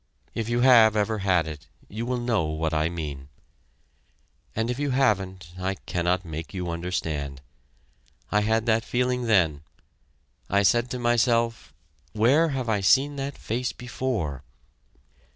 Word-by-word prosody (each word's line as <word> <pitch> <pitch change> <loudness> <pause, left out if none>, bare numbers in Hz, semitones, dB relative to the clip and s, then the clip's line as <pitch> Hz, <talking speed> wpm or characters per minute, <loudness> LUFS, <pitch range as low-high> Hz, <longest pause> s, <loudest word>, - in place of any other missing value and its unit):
If 115 0 -3
you 120 +1 +1
have 115 -4 +7
ever 110 +1 0
had 95 -4 +2
it, 75 -1 -8 0.2
you 115 +4 -5
will 125 0 0
know 120 -8 0
what 80 +1 -2
I 80 +1 +1
mean, 75 -5 -6 1.3
and 115 +2 0
if 125 - -4
you 145 -1 0
haven't 95 -9 0
I 95 +1 -1
cannot 90 +1 -1
make 80 +3 -7
you 90 -2 -3
understand. 80 -5 -3 0.9
I 105 - +3
had 110 +1 +1
that 115 -1 +2
feeling 125 0 0
then.... 85 -9 +3 0.9
I 100 +1 +3
said 120 +6 +3
to 125 - -3
myself: 115 -5 +1 0.4
"Where 135 +10 +4
have 130 -4 -3
I 110 -2 +1
seen 140 +9 +4
that 140 +1 -4
face 120 +3 -3
before?" 115 - -3
110 Hz, 145 wpm, -25 LUFS, 85-120 Hz, 1.3 s, have